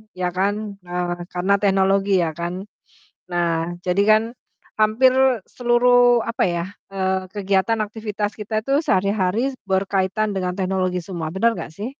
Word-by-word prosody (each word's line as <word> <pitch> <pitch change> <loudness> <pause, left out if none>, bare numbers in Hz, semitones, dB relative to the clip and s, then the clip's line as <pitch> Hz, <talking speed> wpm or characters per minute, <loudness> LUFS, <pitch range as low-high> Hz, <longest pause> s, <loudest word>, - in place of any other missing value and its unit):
ya 180 0 -1
kan, 205 +2 -1
eee, 175 0 -3 0.2
karena 180 +2 +1
teknologi 195 0 +2
ya 160 - -1
kan. 175 +3 -4 0.7
Nah, 170 -1 -1
jadi 180 +2 +2
kan 215 0 +6 0.6
hampir 220 +5 +4 0.4
seluruh 245 0 +4
apa 230 - 0
ya, 170 -1 -1 0.3
eee, 190 0 0
kegiatan 200 +2 +1
aktivitas 210 -1 -4
kita 215 +1 -2
itu 275 +4 +1
sehari-hari 200 +5 +1 0.2
berkaitan 195 +2 0
dengan 180 -2 -2
teknologi 185 -1 -1
semua. 170 -2 -5
Bener 230 +5 +3
nggak 160 -1 -7
sih? 210 +8 -5
195 Hz, 135 wpm, -21 LUFS, 180-215 Hz, 0.7 s, kan